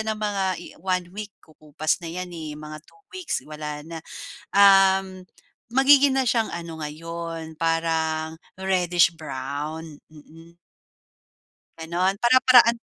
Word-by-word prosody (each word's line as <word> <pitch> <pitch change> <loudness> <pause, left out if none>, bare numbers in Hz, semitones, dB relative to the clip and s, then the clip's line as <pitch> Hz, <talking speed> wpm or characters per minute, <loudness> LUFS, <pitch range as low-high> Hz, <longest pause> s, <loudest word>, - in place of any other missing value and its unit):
yan 220 - -4
ng 215 - -12
mga 200 -2 -1 0.2
i - - -10
1 185 -1 -1
week, 210 0 -7
kukupas 155 0 -3
na 170 - -7
'yan, 180 +1 -6
eh, 155 -3 -7
mga 155 0 -9
2 415 - -22
weeks 370 -3 -4
wala 150 -1 -7
na. 165 0 -8 0.5
Um, 195 -1 +5 0.5
magiging 270 +1 +6
na 255 - 0
syang 225 -1 +1
ano 165 -2 -6
ngayon, 165 +1 -7
parang 160 -1 -1 0.2
reddish-brown. 160 -4 -1
Mm 165 +3 -16 1.2
Gano'n, 175 +4 0
para-paraan 245 -1 +6
170 Hz, 120 wpm, -24 LUFS, 155-195 Hz, 1.2 s, magiging